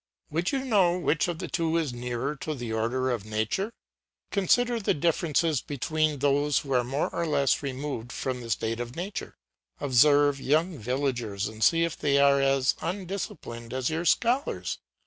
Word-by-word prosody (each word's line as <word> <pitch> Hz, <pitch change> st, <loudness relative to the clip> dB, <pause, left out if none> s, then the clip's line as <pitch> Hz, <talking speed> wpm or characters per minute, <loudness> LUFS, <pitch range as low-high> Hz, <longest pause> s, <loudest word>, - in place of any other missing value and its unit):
Would 165 Hz, +4 st, 0 dB
you 270 Hz, -1 st, -1 dB
know 190 Hz, -8 st, +3 dB
which 165 Hz, -3 st, +1 dB
of 175 Hz, -2 st, -3 dB
the -, -, -5 dB
two 165 Hz, -1 st, 0 dB
is 155 Hz, -6 st, -1 dB
nearer 125 Hz, +4 st, -3 dB
to 155 Hz, +2 st, -4 dB
the 120 Hz, -4 st, -5 dB
order 125 Hz, +4 st, 0 dB
of 115 Hz, -5 st, -2 dB
nature! 110 Hz, -, -2 dB, 0.6 s
Consider 235 Hz, +5 st, +2 dB
the 205 Hz, -, +1 dB
differences 160 Hz, -1 st, +1 dB
between 155 Hz, +2 st, -1 dB
those 145 Hz, +1 st, +2 dB
who 135 Hz, -2 st, -2 dB
are 125 Hz, -1 st, +3 dB
more 135 Hz, +5 st, -1 dB
or 170 Hz, -, -2 dB
less 140 Hz, -3 st, +2 dB
removed 135 Hz, -3 st, -4 dB
from 130 Hz, -1 st, -3 dB
a 115 Hz, -, -8 dB
state 115 Hz, +1 st, -1 dB
of 120 Hz, 0 st, -5 dB
nature. 190 Hz, +4 st, -5 dB, 0.4 s
Observe 145 Hz, +1 st, +4 dB
young 155 Hz, +3 st, +1 dB
villagers 120 Hz, -4 st, -2 dB
and 110 Hz, 0 st, -5 dB
see 165 Hz, 0 st, +5 dB
if 170 Hz, -2 st, -1 dB
they 140 Hz, -1 st, +1 dB
are 140 Hz, 0 st, +5 dB
as 135 Hz, -1 st, +3 dB
undisciplined 170 Hz, -, -5 dB
as 130 Hz, +2 st, -1 dB
your 165 Hz, +2 st, -2 dB
scholars. 245 Hz, -, +1 dB
145 Hz, 170 wpm, -27 LUFS, 125-165 Hz, 0.6 s, see